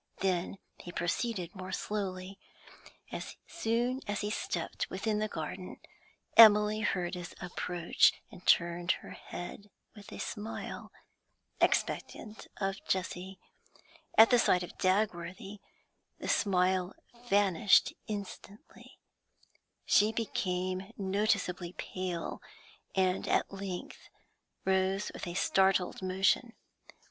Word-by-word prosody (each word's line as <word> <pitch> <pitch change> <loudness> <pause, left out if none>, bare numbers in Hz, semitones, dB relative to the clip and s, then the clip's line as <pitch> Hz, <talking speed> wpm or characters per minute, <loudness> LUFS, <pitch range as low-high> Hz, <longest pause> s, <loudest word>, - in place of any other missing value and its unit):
Then 185 0 0 0.2
he 175 - -8
proceeded 175 +1 -2
more 185 -1 -7
slowly. 190 -1 -4 0.7
As - - -6
soon 245 -3 -1
as 205 0 -2
he 210 0 -2
stepped 380 - -3
within 210 +3 -1
the 215 - 0
garden, 180 +1 -6 0.6
Emily 210 -1 +8
heard 180 -5 -1
his 180 -1 -6
approach, 175 -1 +2 0.2
and 180 - -13
turned 175 +1 +3
her - - -9
head 200 +3 -8 0.3
with 210 +1 -12
a - - -7
smile, 215 0 -6 0.7
expectant 215 -1 -1
of 195 -1 -2
Jessie, 185 0 -2 0.8
At 225 +2 +9
the 245 - +6
sight 180 -5 +3
of 175 - -9
Dagworthy 190 0 -1 0.6
the - - -6
smile 185 -1 +2 0.3
vanished 200 -1 +4
instantly, 205 0 -8 0.9
she 210 +1 +5
became 185 -3 -2
noticeably 190 -3 0
pale, 185 -3 -4 0.5
and 185 -1 +1
at - - +1
length 195 -2 -6 0.6
rose 190 +1 +1
with - - -6
a 175 - -5
startled 190 -1 +2
motion. 190 +5 +1
190 Hz, 105 wpm, -31 LUFS, 180-210 Hz, 0.9 s, At